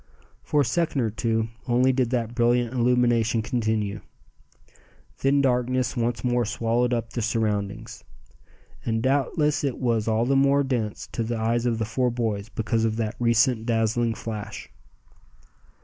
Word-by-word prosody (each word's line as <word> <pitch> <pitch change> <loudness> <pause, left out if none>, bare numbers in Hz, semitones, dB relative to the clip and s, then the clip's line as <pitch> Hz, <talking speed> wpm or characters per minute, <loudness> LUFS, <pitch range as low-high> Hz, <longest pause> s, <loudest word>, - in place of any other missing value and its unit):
For 150 - +1
a - - +1
second 165 -2 0
or 110 -2 0
two 110 0 -1 0.2
only 125 +2 +3
did 130 -2 +1
that 120 -2 -1
brilliant 120 0 +2
illumination 120 -2 +2
continue. 110 -4 -1 1.2
Then 140 +1 +3
darkness 125 -1 +1
once 120 -1 -1
more 120 -1 +1
swallowed 115 +2 0
up 115 -2 -2
the 120 - -2
surroundings; 105 -3 -2 0.8
and 115 0 -1
doubtless 145 +3 +1
it 140 -3 -1
was 115 -4 0
all 110 +1 +2
the 135 +2 +2
more 140 +1 +4
dense 120 -6 -2
to - - -3
the 115 +1 -2
eyes 115 +2 0
of 115 -2 0
the 110 - -1
four 125 +3 0
boys 110 -4 -2
because 110 +1 -1
of 110 -1 0
that 110 -2 -2
recent 115 0 +2
dazzling 115 0 +1
flash. 110 -2 -7
120 Hz, 150 wpm, -25 LUFS, 110-125 Hz, 1.2 s, more